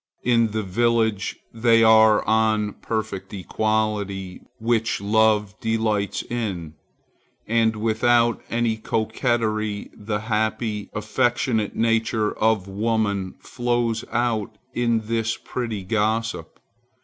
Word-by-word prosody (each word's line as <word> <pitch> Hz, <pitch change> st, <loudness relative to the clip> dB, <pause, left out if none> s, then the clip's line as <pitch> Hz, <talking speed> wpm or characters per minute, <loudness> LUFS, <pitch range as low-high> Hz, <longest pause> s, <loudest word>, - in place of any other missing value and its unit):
In 115 Hz, -2 st, +3 dB
the 110 Hz, 0 st, -2 dB
village 110 Hz, 0 st, 0 dB, 0.2 s
they 115 Hz, 0 st, +4 dB
are 110 Hz, -1 st, +6 dB
on 110 Hz, -1 st, +2 dB
a -, -, -11 dB
perfect 105 Hz, -4 st, -4 dB
equality, 100 Hz, -2 st, -2 dB, 0.2 s
which 115 Hz, 0 st, 0 dB
love 105 Hz, 0 st, +2 dB
delights 110 Hz, -3 st, -1 dB
in, 95 Hz, -10 st, -4 dB, 0.7 s
and 115 Hz, 0 st, +2 dB
without 115 Hz, +2 st, +2 dB
any 115 Hz, -1 st, 0 dB
coquetry 110 Hz, -1 st, -1 dB
the 105 Hz, 0 st, -4 dB
happy, 110 Hz, -1 st, -1 dB
affectionate 110 Hz, +1 st, 0 dB
nature 115 Hz, -1 st, +1 dB
of 110 Hz, -3 st, +2 dB
woman 100 Hz, -2 st, -1 dB
flows 120 Hz, -2 st, -1 dB
out 110 Hz, -3 st, -1 dB, 0.2 s
in 115 Hz, -2 st, +1 dB
this 115 Hz, 0 st, -1 dB
pretty 115 Hz, -6 st, -4 dB
gossip. 110 Hz, +3 st, -1 dB
110 Hz, 100 wpm, -23 LUFS, 105-115 Hz, 0.7 s, are